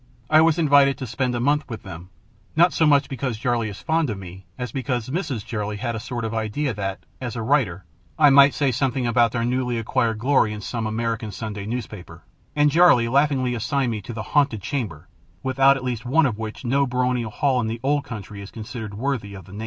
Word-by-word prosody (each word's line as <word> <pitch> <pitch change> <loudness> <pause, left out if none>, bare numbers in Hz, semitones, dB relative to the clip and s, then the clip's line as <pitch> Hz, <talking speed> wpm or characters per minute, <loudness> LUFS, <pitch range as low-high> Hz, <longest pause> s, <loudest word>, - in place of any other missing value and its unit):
I 155 0 +7
was 160 0 +3
invited 140 -4 +4
to 130 - -5
spend 125 +2 -2
a - - -1
month 145 +4 +1
with 115 -2 -7
them, 90 -2 -9 0.5
not 170 +2 +5
so 160 - +3
much 145 -1 +4
because 130 -3 -3
Jarley 120 -2 0
is 100 - -10
fond 160 -2 +1
of 105 - -3
me 95 -1 -11
as 125 -2 -4
because 125 -3 -3
Mrs. 145 - -3
Jarley 105 -2 -3
had 115 +1 -3
a - - -3
sort 120 0 -4
of 110 - -3
an 115 - 0
idea 115 +5 -2
that, 95 -2 -5 0.2
as 120 -2 -4
a 115 - -3
writer, 110 - +1 0.3
I 150 -2 +6
might 140 0 +7
say 140 -3 +1
something 125 +1 0
about 120 -1 +3
their 115 -1 -1
newly 125 -1 -1
acquired 115 0 0
glory 115 -2 +2
in 105 - -7
some 115 +2 -3
American 115 -1 -2
Sunday 105 -2 -6
newspaper; 105 -8 -6 0.3
and 150 0 +4
Jarley 155 -8 +5
laughingly 135 -2 +2
assigned 125 +2 -1
to - - -16
me - - -8
the 110 - -4
"haunted 140 -9 +1
chamber," 100 - -4 0.4
without 135 +1 +4
at 130 - -7
least 125 -3 -3
one 150 +6 +3
of 115 -5 -1
which 110 +3 -6
no 135 +3 +2
baronial 125 -2 0
hall 130 +3 +1
in 110 - -2
the 115 +1 -4
old 145 +1 +1
country 105 -3 -8
is 100 - -9
considered 110 -2 -7
worthy 110 -4 -3
of 95 -3 -11
the - - -15
name. 100 - -8
120 Hz, 225 wpm, -23 LUFS, 110-140 Hz, 0.5 s, I